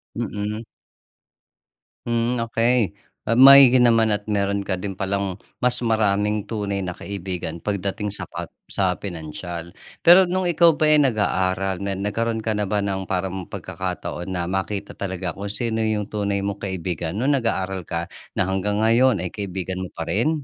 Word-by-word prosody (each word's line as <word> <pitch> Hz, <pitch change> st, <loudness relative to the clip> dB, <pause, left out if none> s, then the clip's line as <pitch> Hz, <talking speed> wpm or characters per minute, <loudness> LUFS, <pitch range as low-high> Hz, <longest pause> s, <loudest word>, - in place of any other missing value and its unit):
Mm. 105 Hz, -1 st, -3 dB, 1.4 s
Hmm, 120 Hz, +1 st, 0 dB
okey. 115 Hz, -3 st, +2 dB, 0.3 s
Ah, 115 Hz, +2 st, +1 dB
maigi 135 Hz, -1 st, +9 dB
naman 115 Hz, -2 st, +4 dB
at 105 Hz, 0 st, -2 dB
meron 100 Hz, -1 st, 0 dB
ka 95 Hz, -, 0 dB
din 95 Hz, +2 st, -4 dB
palang 95 Hz, -1 st, -2 dB, 0.2 s
mas 125 Hz, 0 st, +2 dB
maraming 105 Hz, -2 st, +1 dB
tunay 100 Hz, -3 st, -3 dB
na 90 Hz, -, -3 dB
kaibigan 90 Hz, -3 st, -6 dB
pagdating 100 Hz, +1 st, -2 dB
sa -, -, -6 dB
pa -, -, -7 dB, 0.2 s
sa 95 Hz, -2 st, 0 dB
pinansiyal. 85 Hz, -1 st, -6 dB, 0.3 s
Pero 180 Hz, +2 st, +8 dB
nung 185 Hz, +1 st, 0 dB
ikaw 170 Hz, -2 st, +4 dB
ba 155 Hz, -, -1 dB
eh, 150 Hz, -, +6 dB
nag-aaral 95 Hz, -7 st, +1 dB
na 100 Hz, 0 st, -2 dB
nagkaroon 110 Hz, +3 st, -2 dB
ka 110 Hz, -, 0 dB
na 105 Hz, -, 0 dB
ba 105 Hz, +1 st, 0 dB
ng 95 Hz, -2 st, -2 dB
parang 95 Hz, -1 st, -3 dB
pagkakataon 85 Hz, -, -5 dB
na 90 Hz, -, -1 dB
makita 95 Hz, +1 st, -2 dB
talaga 95 Hz, -2 st, -4 dB
kung 100 Hz, +5 st, -6 dB
sino 115 Hz, +2 st, -2 dB
'yong 110 Hz, -2 st, -1 dB
tunay 100 Hz, -1 st, -1 dB
mong 100 Hz, 0 st, -3 dB
kaibigan 85 Hz, -3 st, -3 dB
nung 130 Hz, +7 st, +1 dB
nag-aaral 95 Hz, -6 st, -2 dB
ka 85 Hz, +2 st, -3 dB, 0.2 s
na -, -, +2 dB
hanggang 95 Hz, +3 st, 0 dB
ngayon 115 Hz, -3 st, +4 dB
ay 90 Hz, -, -4 dB
kaibigan 95 Hz, -2 st, -4 dB
mo 95 Hz, -, -4 dB
pa 85 Hz, -, -3 dB
rin? 145 Hz, -, 0 dB
100 Hz, 160 wpm, -23 LUFS, 95-115 Hz, 1.4 s, maigi